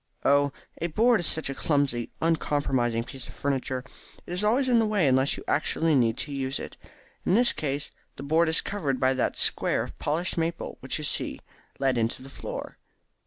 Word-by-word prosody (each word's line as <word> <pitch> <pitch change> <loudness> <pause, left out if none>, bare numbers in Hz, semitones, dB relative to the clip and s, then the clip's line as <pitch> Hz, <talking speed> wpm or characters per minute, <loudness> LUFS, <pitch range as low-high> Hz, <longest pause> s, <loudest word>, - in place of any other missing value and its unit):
"Oh, 140 0 +4 0.3
a 170 - +1
board 225 +8 +3
is 175 - 0
such 160 - +2
a 135 - -2
clumsy 140 -5 0
uncompromising 135 -7 +1
piece 130 +1 -8
of - - -12
furniture. 130 -2 -2 0.4
It - - -6
is 180 +3 0
always 245 +6 +3
in 245 -2 +4
the 225 - +2
way 205 -7 +2
unless 130 +1 +2
you - - -8
actually 165 0 +1
need 120 -4 +3
to - - -10
use 135 -1 -2
it. - - -7 0.5
In 185 - +2
this 240 +2 +5
case 140 -1 -2 0.2
the 135 - -8
board 160 +3 +3
is 160 - +5
covered 145 -11 -2
by 130 0 +3
that 130 - -1
square - - +2
of - - -10
polished 170 +4 -1
maple 165 +1 -3
which 130 - -1
you 155 - -6
see - - -2 0.4
let 130 -3 +1
into 115 +3 -1
the 135 - -12
floor. - - -7
145 Hz, 200 wpm, -27 LUFS, 130-170 Hz, 0.5 s, this